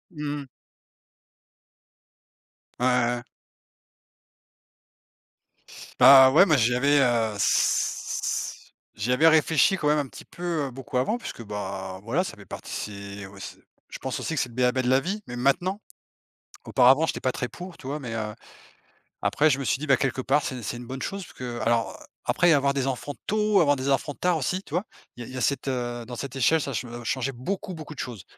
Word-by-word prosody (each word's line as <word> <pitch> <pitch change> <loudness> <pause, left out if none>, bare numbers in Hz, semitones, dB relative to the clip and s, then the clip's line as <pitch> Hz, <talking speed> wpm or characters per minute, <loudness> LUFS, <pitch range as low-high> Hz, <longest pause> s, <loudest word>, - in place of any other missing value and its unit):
Mmh 150 -1 -3
mh. 140 - -11 2.3
Ouais, 125 - +1
ouais, 125 -1 +3
ouais. 120 - -6 2.8
Bah, 130 -1 +9
ouais, 160 +8 +7
mais 155 -6 +3
j'y 120 -1 +3
avais, 140 +3 +3
heu, 120 -4 +2
s 100 - 0 0.2
j'y 110 +3 -2
avais 145 +6 +5
réfléchi 160 +3 +4
quand 150 - -1
même 150 0 +3
un 145 - -2
petit - - -12
peu, 170 -4 -3
heu, - - -8
beaucoup 130 0 -5
avant 135 - +1
puisque, 175 - -8
bah, 95 -3 -5
voilà 130 - 0
ça 180 - -7
fait 105 - -13
partie 100 +1 -7
aussi 100 0 -10 0.3
je - - -7
pense - - -4
aussi 160 - -3
que - - 0
c'est 125 - -2
le 115 - -15
b.a.-ba 125 +1 +2
de 125 - 0
la 130 +1 +4
vie, 195 +8 -3
mais 120 - -6
maintenant. 175 - +1 0.8
Auparavant 135 +5 +5
j'étais - - -3
pas 130 - +1
très 125 - -3
pour, 180 +4 -10
tu - - -12
vois? 145 +3 -3
Mais, 125 -5 -6
heu, 105 -1 -3 0.9
après 155 +2 +3
je 135 -1 +1
me - - -3
suis 130 - +1
dit: 155 - -5
«Bah, 135 - +6
quelque 135 0 -1
part 140 +3 +2
c'est 130 -2 -4
c'est 110 - -3
une 120 - -9
bonne 130 +1 -6
chose 195 0 -4
puisque 160 - -14 0.2
alors, 115 0 +1 0.3
après 175 - +3
avoir 140 -1 +2
des 135 -1 -1
enfants 135 +2 -3
tôt, 210 -2 +3
avoir 145 -3 +4
des 130 +1 -2
enfants 140 +1 0
tard 180 -1 +1
aussi, 180 +6 -1
tu 150 - -14
vois? 180 +4 +1 0.3
Il 120 - -9
y - - -8
a - - -11
il - - -10
y - - -4
a - - -3
cette, 140 +3 0
heu 120 -2 -3
dans 120 +1 -7
cette 135 0 -6
échelle 135 +5 +3
ça 140 - -4
che 120 +1 -2 0.2
changeait 130 +3 -1
beaucoup 185 +10 -4
beaucoup 155 -1 -8
de - - -13
choses. 115 -7 -6
135 Hz, 205 wpm, -26 LUFS, 120-150 Hz, 2.8 s, Bah